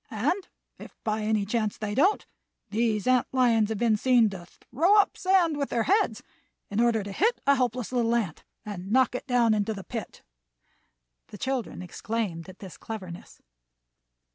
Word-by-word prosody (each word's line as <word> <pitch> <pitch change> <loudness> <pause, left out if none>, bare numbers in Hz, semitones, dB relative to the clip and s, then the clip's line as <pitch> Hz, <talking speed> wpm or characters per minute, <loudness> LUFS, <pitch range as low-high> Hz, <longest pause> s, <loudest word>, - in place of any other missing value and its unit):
And 295 - -1 0.3
if - - -12
by 215 0 -1
any 215 -1 0
chance 215 0 -1
they 210 -1 -4
don't, 340 - +2 0.5
these 215 -1 0
ant 255 -1 +3
lions 235 -5 +3
have 220 - -2
been 225 -1 +2
seen 240 -2 +4
to 175 -3 -9
throw 345 - +1
up 405 - +3
sand 365 -5 +2
with 280 -1 -2
their 230 - 0
heads 405 - +1 0.5
in 205 - -1
order 235 -3 +2
to 200 - -7
hit 445 - +1
a 280 - +5
helpless 250 -3 -1
little 235 -2 +1
ant 200 -10 -2 0.2
and 195 -2 -6
knock 260 +2 +3
it 250 - -5
down 240 -3 +3
into 215 +1 -1
the 195 - -8
pit." 225 -3 -7 1.0
The 205 - -11
children 255 -6 -3
exclaimed 190 -2 -4
at 185 - -12
this 190 -3 -11
cleverness. 185 -6 -9
230 Hz, 170 wpm, -27 LUFS, 205-255 Hz, 1.0 s, a